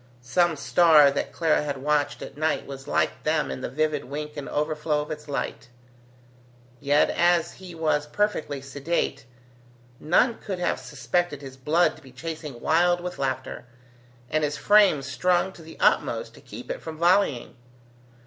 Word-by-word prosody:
Some 170 +7 +2
star 150 -1 +5
that 140 - -3
Clara 165 -2 +2
had 145 -2 -3
watched 145 +1 0
at - - -9
night 155 +1 -1
was 135 -1 -9
like - - 0
them - - 0
in 65 - -5
the - - -3
vivid 155 +2 -1
wink 150 +2 -6
and 145 -2 -6
overflow 150 0 -1
of 150 - -7
its 150 0 -7
light. 135 -3 -4 1.1
Yet, 145 +3 +3
as 175 -1 +2
he 185 -2 -11
was 155 -2 0
perfectly 155 -6 -1
sedate, 140 0 -2 0.7
none 225 +10 +2
could 195 -3 -5
have 175 - -1
suspected 175 -5 -2
his 135 -1 -9
blood 155 +7 +2
to - - -16
be 135 -3 -15
chasing 150 -1 -7
wild 175 +2 +3
with 180 0 -6
laughter, 130 -2 -3 0.6
and 155 +4 0
his 145 0 -1
frame 205 -9 +5
strung 180 +7 +1
to 170 - -14
the 160 0 -12
utmost - - +1
to - - -16
keep - - -9
it - - -5
from 160 - -7
volleying. 170 -8 +2
150 Hz, 165 wpm, -25 LUFS, 140-175 Hz, 1.1 s, star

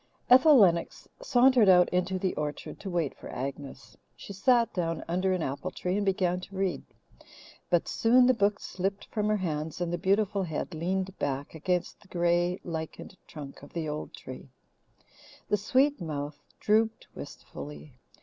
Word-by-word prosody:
Ethel 265 +3 +8
Lennox 170 -6 +2
sauntered 250 - +5
out 180 -1 +7
into 180 +1 0
the 185 0 -1
orchard 150 -1 -5
to 200 - -6
wait 170 -6 -1
for - - -11
Agnes. 135 +1 -7 0.2
She 200 - -9
sat 235 +3 +3
down 165 -3 -2
under 185 +3 0
an 185 -3 0
apple 140 +7 -3
tree 180 0 -3
and 205 - 0
began 185 -2 +1
to 195 +2 -11
read, 190 -1 -1 0.9
but 175 -1 +2
soon 245 +2 +4
the 255 - +5
book 200 -3 +1
slipped 195 +2 -3
from 210 -2 -1
her 215 - +2
hands 160 -4 -3
and 175 -1 -2
the 175 - -1
beautiful 200 +2 +1
head 170 0 -4
leaned 185 +4 -2
back 140 0 -3
against 180 +4 -2
the 205 - -20
grey, 175 0 +1
lichened 160 +2 -6
trunk 145 -3 -9
of 145 - -14
the 165 -2 -3
old 150 0 -5
tree. 130 +1 -10 1.0
The 210 - +3
sweet 260 +4 +2
mouth 145 -2 -5 0.2
drooped 220 +1 +1
wistfully. 75 +1 -9
180 Hz, 165 wpm, -28 LUFS, 160-200 Hz, 1.0 s, Ethel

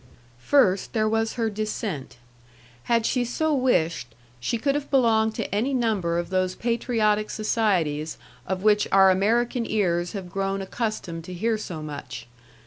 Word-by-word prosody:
First, 195 - +2
there 215 -1 +2
was 225 0 0
her 230 -2 -1
descent. 210 - -4 0.7
Had 230 -1 +2
she 250 0 +1
so 305 +6 0
wished, 170 - 0 0.2
she 230 - -1
could 275 +5 +1
have 290 0 -3
belonged 220 -5 +3
to - - -4
any 245 +7 0
number 205 -9 0
of 175 +1 -3
those 185 0 0
patriotic 220 -3 0
societies 180 -9 0 0.3
of 190 0 -2
which 210 -1 +4
our 190 -1 +7
American 230 +6 +1
ears 175 -4 0
have 190 -4 -6
grown 195 0 -1
accustomed 195 -5 -4
to 185 - -7
hear 225 +5 0
so 175 -7 -6
much. 140 -5 -7
210 Hz, 150 wpm, -25 LUFS, 180-230 Hz, 0.7 s, our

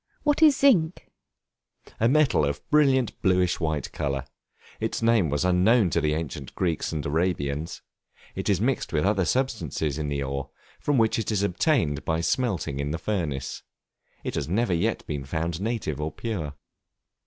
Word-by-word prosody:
What 295 +1 +2
is 300 -4 +7
Zinc? 185 - +3 0.9
A 115 - +4
metal 150 - +3
of 70 +1 0
a - - -29
brilliant 135 -5 +3
bluish 90 -2 +2
white 80 -3 -2
color. 70 -2 -2 0.5
Its - - -2
name 115 -8 +3
was 75 +4 0
unknown 90 +2 +4
to - - +1
the 75 0 +1
ancient 75 -4 -5
Greeks 85 -4 -1
and 75 -3 -3
Arabians. 80 -1 -1 0.5
It - - -3
is 100 -4 +3
mixed 130 +6 0
with 75 +2 +1
other 100 -2 +2
substances 85 - -1
in 75 - -2
the 70 -1 -1
ore, 70 0 -4 0.3
from 145 -2 +1
which 115 -1 +3
it 110 - -2
is 100 -2 +1
obtained 90 - +1
by 80 0 0
smelting 90 - -1
in 70 0 -2
the 80 - -2
furnace. 80 -9 -3 0.6
It - - -3
has 70 - -3
never 105 +1 +1
yet 85 - 0
been 75 -2 -4
found 80 +4 -3
native 100 - -2
or 75 +1 -2
pure. 85 -11 -4
85 Hz, 170 wpm, -26 LUFS, 75-115 Hz, 0.9 s, is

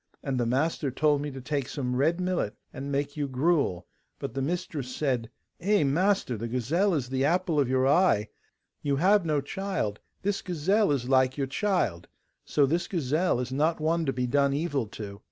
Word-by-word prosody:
And 135 -3 -1
the 120 - +1
master 140 +3 0
told 145 +2 +2
me 145 - -3
to 135 -1 -8
take 140 0 -2
some 125 -4 -2
red 160 +7 +2
millet 180 - -1 0.2
and 140 +2 -5
make 140 +1 -1
you 145 -2 -1
gruel, 135 - +1 0.3
but - - -5
the 135 - -2
mistress 145 -4 -3
said, 125 -6 -1 0.3
'Eh, 205 0 +2
master, 165 - +1
the 115 +3 -4
gazelle 155 - +1
is 125 -5 -2
the 130 0 0
apple 165 +1 +2
of 135 -3 +2
your 130 0 +2
eye; 140 - +3 0.5
you 140 -1 0
have 185 +4 +3
no 150 -2 +1
child, 165 - -3 0.2
this 200 0 0
gazelle 185 +3 +1
is 130 -4 -1
like 130 0 +3
your 140 - 0
child; 135 - -1 0.4
so 145 - +2
this 170 +5 0
gazelle 160 -3 0
is 125 0 -3
not 155 +5 +1
one 160 +1 0
to - - +2
be 125 -1 -1
done 140 +2 +2
evil 145 -6 -1
to. 100 -1 -8
140 Hz, 190 wpm, -28 LUFS, 130-170 Hz, 0.5 s, eye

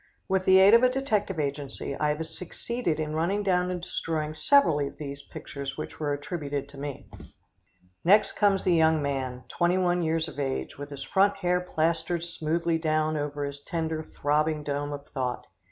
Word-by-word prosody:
With 190 -1 +1
the 190 0 +7
aid 195 +3 +7
of 230 - +8
a 255 - +5
detective 215 - -1
agency, 140 -1 -3
I 150 +1 0
have 150 +2 -1
succeeded 180 +2 -3
in 155 -1 -2
running 190 +6 0
down 180 -2 +2
and 180 -1 -2
destroying 155 -3 -3
several 165 - +4
of 140 -1 -3
these 140 -1 -6
pictures 140 -1 -7
which - - -6
were 150 -2 -1
attributed 145 -1 -3
to 140 -1 -12
me. 140 -1 -6 1.0
Next 205 +5 +5
comes 200 -2 +2
the 180 - +3
young 160 -1 +4
man, 130 -3 -3
21 175 0 +2
years 160 0 0
of - - -8
age, 135 -2 -2
with 145 +1 -7
his 140 -1 -7
front 200 +1 +3
hair 180 -2 +1
plastered 165 0 0
smoothly 165 0 0
down 155 -1 +1
over 145 -1 -2
his 140 0 -6
tender, 160 -2 -2
throbbing 150 0 0
dome 145 0 -2
of 145 -1 -6
thought. 125 -3 -3
160 Hz, 180 wpm, -27 LUFS, 145-180 Hz, 1.0 s, of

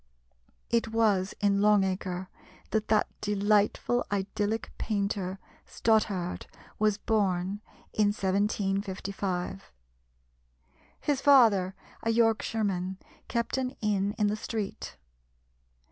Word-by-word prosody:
It 230 -1 +2
was 215 -4 +1
in 200 -1 +3
Long 210 -1 +5
Acre 185 -1 -3 0.4
that 215 -1 0
that 215 -1 +3
delightful 210 +3 +2
idyllic 205 +2 -1
painter, 200 -3 -1 0.3
Stothard, 205 -5 0 0.3
was 215 -1 +2
born 200 -3 0 0.3
in 210 -1 +3
1755. 195 -2 -1 1.3
His 285 -3 0
father, 220 -10 +5 0.3
a 225 - -1
Yorkshireman, 215 -5 +1 0.3
kept 235 +2 -1
an 255 -1 -3
inn 205 -1 0
in 210 - +2
the 205 +1 +1
street. 215 -2 -5
205 Hz, 95 wpm, -29 LUFS, 195-220 Hz, 1.3 s, Long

